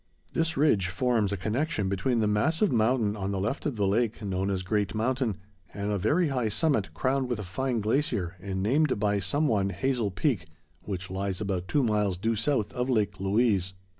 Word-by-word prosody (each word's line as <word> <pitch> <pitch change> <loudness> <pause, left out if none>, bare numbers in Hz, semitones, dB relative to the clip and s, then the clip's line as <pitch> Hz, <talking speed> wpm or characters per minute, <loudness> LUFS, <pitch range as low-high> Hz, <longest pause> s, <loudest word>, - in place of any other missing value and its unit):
This 165 -2 0
ridge 110 - +3
forms 110 +1 +1
a 100 - -1
connection 110 - -1
between 100 +5 0
the 105 - +2
massive 160 - +2
mountain 110 -2 +2
on 100 -2 -3
the 100 - -1
left 115 +10 -2
of 140 - -2
the 105 -2 +1
lake, 110 +3 +1
known 95 -1 -1
as 95 -2 -1
Great 100 +1 -1
Mountain, 120 -2 0 0.4
and 100 0 -2
a 100 - 0
very 150 - +2
high 125 -5 0
summit, 135 -3 +1
crowned 130 0 0
with 120 - -1
a 105 - -5
fine 115 +6 -2
glacier, 105 - 0
and 95 0 -3
named 135 +2 +2
by 105 -1 +1
some 145 - +1
one 100 -5 +1
Hazel 115 +3 0
Peak, 100 - -1 0.4
which 95 -2 -5
lies 95 0 -2
about 95 -3 -2
two 145 +5 +2
miles 105 -5 +1
due 115 +5 0
south 115 0 0
of 125 0 -2
Lake 105 -5 +1
Louise. 95 -2 +1
105 Hz, 195 wpm, -28 LUFS, 95-130 Hz, 0.4 s, ridge